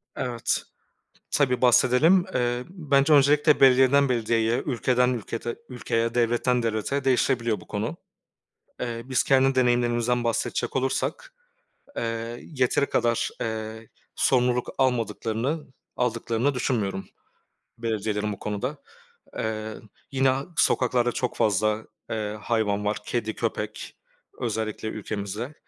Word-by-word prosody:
Evet, 120 -2 -1 0.7
tabii 130 -3 +1
bahsedelim. 130 +9 +5
Eee, 120 0 0
bence 150 -5 +2
öncelikle 150 +1 +5
belediyeden 135 +1 +6
belediyeye, 115 0 +1
ülkeden 125 -2 +2
ülkete 115 0 -4
ülkeye, 115 -2 -1
devletten 120 +1 +2
devlete 115 +5 -1
değişebiliyor 125 -3 +1
bu - - -15
konu. 110 +9 -3 0.8
Eee, 115 -1 -3
biz 130 -1 +1
kendi 135 0 +3
deneyimlerimizden 120 -1 +2
bahsedecek 115 -1 -1
olursak, 135 - -1 0.6
eee, 115 +1 -3
yeteri 130 -1 +1
kadar, 120 -1 +1
eee, 110 -1 -4 0.3
sorumluluk 125 -1 +2
almadıklarını, 125 +3 -1 0.3
aldıklarını 125 +2 0
düşünmüyorum 105 -7 -1 0.7
belediyelerin 105 -2 -2
bu 100 - -11
konuda. 115 +8 -3 0.6
Eee, 110 0 -3 0.4
yine 135 -1 +3 0.2
sokaklarda 125 -3 +2
çok 125 +1 -2
fazla, 110 +1 +1 0.2
eee, 105 -1 -3
hayvan 105 -2 0
var. 105 +1 0
Kedi, 110 -2 -2
köpek 110 -2 -4 0.4
özellikle 110 -1 -2
ülkemizde. 110 +5 -5
120 Hz, 105 wpm, -25 LUFS, 110-130 Hz, 0.8 s, belediyeden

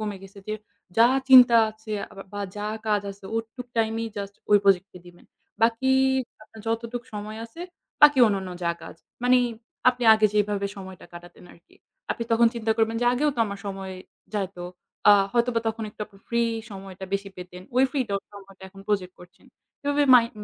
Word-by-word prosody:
কমে 210 -2 -3
গেছে 195 +1 -13
যে, 215 - -1 0.4
যা 230 +1 +7 0.2
চিন্তা 250 -3 +9
আছে 215 0 -10 0.2
আ - - -15 0.2
বা 205 - -5 0.2
যা 210 +1 -3 0.2
কাজ 210 -1 +1
আছে 195 0 -14
ওটুক 225 +2 -5
টাইমেই 225 0 0
just 200 0 -5 0.2
ওই 205 - +7
প্রজেক্টকে 195 -1 +2
দিবেন। 175 0 -16 0.4
বাকিই 260 +4 +3 0.4
আপনার 220 +1 -14
যতটুক 230 +1 -3
সময় 210 +1 -6
আছে, 230 +9 -12 0.4
বাকি 295 -2 +8
অন্যান্য 195 -3 -1
যা 170 - +1
কাজ, 165 - -10 0.3
মানি 255 +1 +5 0.5
আপনি 250 0 -1
আগে 215 0 +4
যেভাবে 205 -1 +1
সময়টা 190 -2 -10
কাটাতেন 175 +1 -13
আরকি। 170 - -23 0.4
আপনি 230 - -2
তখন 235 +1 +5
চিন্তা 225 -1 -2
করবেন 225 0 +1
যে - - +1
আগেও 290 +4 +1
তো - - -10
আমার 200 -1 -6
সময় 195 -1 -5 0.4
যাইতো। 195 -3 -3 0.5
আ 205 - +10 0.2
হয়তোবা 235 -1 +1
তখন 225 0 -4
একটু 210 - -24
আপনি 200 -2 -21
free 235 0 +1 0.2
সময়টা 195 -1 -9
বেশি 200 0 -3
পেতেন। 180 0 -10
ওই 260 - +6
free 275 -1 0
টা 200 - -2 0.2
সময়টা 195 -1 -14
এখন 195 0 -15
প্রজেক্ট 185 -3 -1
করছেন। 180 +2 -17 0.4
এভাবে 285 0 +1
mind 235 -1 +5
210 Hz, 180 wpm, -25 LUFS, 195-230 Hz, 0.5 s, আ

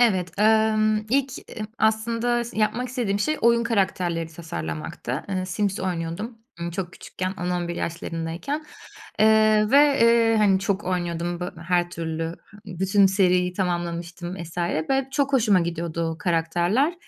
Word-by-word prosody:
Evet, 185 -8 +2
emm, 215 0 +4
ilk, 270 -1 +1
eee, 215 - -7
aslında 230 +2 +1
s 235 -2 -7
yapmak 230 +4 0
istediğim 240 -6 -1
şey 305 +8 0
oyun 235 0 +4
karakterleri 180 -6 0
tasarlamaktı. 85 - -5
Eee, 185 -1 -2
Sims 195 +2 -1
oynuyordum, 185 +5 -4 0.2
ımm, 170 - -3
çok 175 0 -4
küçükken. 185 0 -5
10-11 175 -1 -2
yaşlarındayken. 170 - -4 0.6
Eee, 215 0 +5
ve, 285 0 +5
eee, 230 -1 +5
hani, 200 -3 +4
çok 195 +1 -1
oynuyordum 175 -1 -2
bö 180 - -3 0.2
her 175 -1 +2
türlü. 165 -1 -3 0.4
He 195 - -8
ı 175 - -10
bütün 195 +1 +4
seriyi 180 -2 +2
tamamlamıştım 175 -1 -3
vs. 170 +1 -9
ve 175 - 0
çok 280 0 0
hoşuma 215 -8 +4
gidiyordu 170 -1 -2
o 160 - -6
karakterler. 175 - +1
190 Hz, 145 wpm, -24 LUFS, 170-220 Hz, 0.6 s, Eee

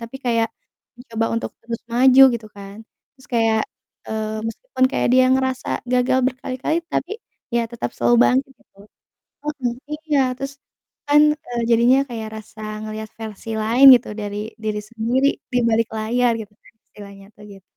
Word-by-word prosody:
tapi 230 +3 -8
kayak, 230 -2 +1 0.6
coba 225 0 0
untuk 230 - -3
terus 230 -1 -5
maju 260 +2 +6
gitu 225 -2 -6
kan. 200 0 -10 0.4
Terus 260 - -19
kayak, 225 -1 +2 0.5
eee, 220 0 -3
meskipun 260 - -2
kayak - - 0
dia 255 0 +6
ngerasa 260 -1 -1 0.2
gagal 250 +1 +2
berkali-kali, 260 +4 -2 0.2
tapi, 365 - -2 0.4
ya 235 - +2
tetap 235 - -4
selalu 240 - +3
bangkit 270 +2 +1
gitu. 195 - -30 0.7
Heeh, 285 -5 -2 0.4
iya, 290 -2 +3 0.9
kan, 295 +1 +6 0.3
eee, 240 -1 -3
jadinya 240 +3 +5
kayak 220 -2 -5
rasa 215 0 -12 0.2
ngelihat 215 0 -6
versi 220 0 -8
lain 240 +5 +4
gitu 240 - -2
dari 205 0 -5 0.3
diri 210 -1 -2
sendiri 235 +4 +1 0.3
dibalik 230 -2 +2
layar 235 +3 +1
gitu, 210 -1 -11 0.4
istilahnya 200 -1 -13
tuh 210 - -16
gitu. 195 -1 -16
235 Hz, 145 wpm, -21 LUFS, 220-255 Hz, 0.9 s, maju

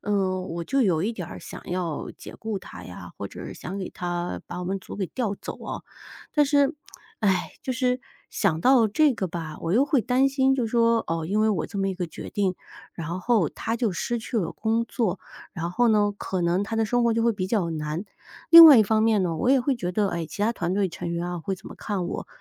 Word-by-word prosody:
呃， 195 -2 0
我 170 -2 -5
就 270 +6 +1
有 170 -6 +2
一 220 +5 0
点 180 -6 -6
儿 - - -8
想 - - -9
要 175 -4 -3
解 - - -10
雇 220 -3 -3
他 - - -11
呀， - - -9
或 - - -4
者 - - -8
想 190 - -7
给 190 - -5
他 175 0 -3
把 175 - -6
我 180 - -4
们 195 +2 -2
组 - - -10
给 195 - -2
调 220 0 -2
走 - - -8
啊， - - -5 0.5
但 295 -2 +4
是， 285 -1 +3 0.5
哎， 195 -4 +1
就 260 - -2
是 250 +1 0 0.3
想 175 -7 0
到 250 +2 +5
这 285 +8 +3
个 195 - -2
吧， 160 -3 -6
我 165 - -2
又 245 +7 +4
会 290 -4 +3
担 255 +5 +3
心 270 -1 +2
就 250 -3 0
说， 230 0 +3
哦， 165 0 -2
因 205 +5 +1
为 220 - +3
我 190 -7 0
这 200 - -6
么 195 - +1
一 190 - -2
个 180 -1 -3
决 160 - -9
定， 195 -3 0 0.4
然 170 +1 -4
后 210 -5 +2
他 225 - -3
就 235 -2 0
失 240 +7 -2
去 230 +1 -5
了 185 -6 -1
工 225 +1 0
作， 205 -7 -1 0.4
然 170 0 -3
后 240 +6 +2
呢， 210 -2 +3
可 190 -2 -3
能 175 +3 +1
他 225 +2 -3
的 225 - +2
生 245 +3 +1
活 235 -1 +3
就 230 - +1
会 235 - +3
比 190 -3 -3
较 190 -5 0
难。 155 +3 -3 0.5
另 335 0 +13
外 295 -4 +10
一 - - +7
方 215 +1 +2
面 220 -3 +3
呢， 170 -2 -1
我 245 - 0
也 270 +1 +5
会 260 +2 +1
觉 180 -7 -3
得， 205 +1 +1
哎， 170 -1 -3
其 150 +6 -5
他 225 +2 +2
团 175 -5 -2
队 200 -1 +1
成 170 +1 -5
员 170 +1 -2
啊 175 0 -3
会 195 +3 -2
怎 185 - -15
么 - - -9
看 195 -5 -3
我？ - - -5
205 Hz, 270 characters per minute, -25 LUFS, 175-230 Hz, 0.5 s, 另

